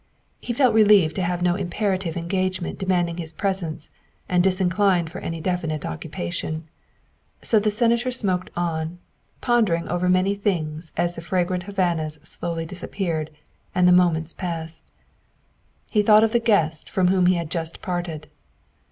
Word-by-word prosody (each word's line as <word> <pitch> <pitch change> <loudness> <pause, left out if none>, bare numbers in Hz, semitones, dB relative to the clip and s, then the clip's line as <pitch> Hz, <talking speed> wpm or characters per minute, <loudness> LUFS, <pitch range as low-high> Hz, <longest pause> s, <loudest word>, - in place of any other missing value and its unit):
He - - -4
felt 250 0 +3
relieved 205 -7 +5
to - - 0
have 175 0 -1
no 175 -1 +3
imperative 185 -2 -2
engagement 185 +1 -2
demanding 175 -3 0
his 165 -2 -4
presence 175 -4 -3 0.4
and 180 -1 +2
disinclined 185 -2 +2
for 185 - -6
any 165 0 -4
definite 160 -3 -2
occupation. 90 - -4 0.8
So 220 - +5
the 210 +1 +1
Senator 235 +3 +2
smoked 195 -7 -1
on, 165 -1 -2 0.4
pondering 215 -9 +2
over 175 +1 0
many 185 +2 +3
things 165 -6 -2
as 175 0 +1
the 165 - -7
fragrant 180 0 -1
Havanas 175 -6 0
slowly 165 +1 -4
disap 185 +3 -8
peared 165 -6 -1 0.5
and 180 0 +4
the - - +6
moments 170 -3 +3
passed. 165 -3 -5 1.1
He 210 - +4
thought 210 +1 +6
of 225 - +2
the 235 - +3
guest 170 -9 +1
from 185 -1 +2
whom 185 -1 +3
he 185 - +4
had 170 -3 -4
just 165 0 -4
parted. 175 -4 -4
180 Hz, 150 wpm, -23 LUFS, 165-195 Hz, 1.1 s, the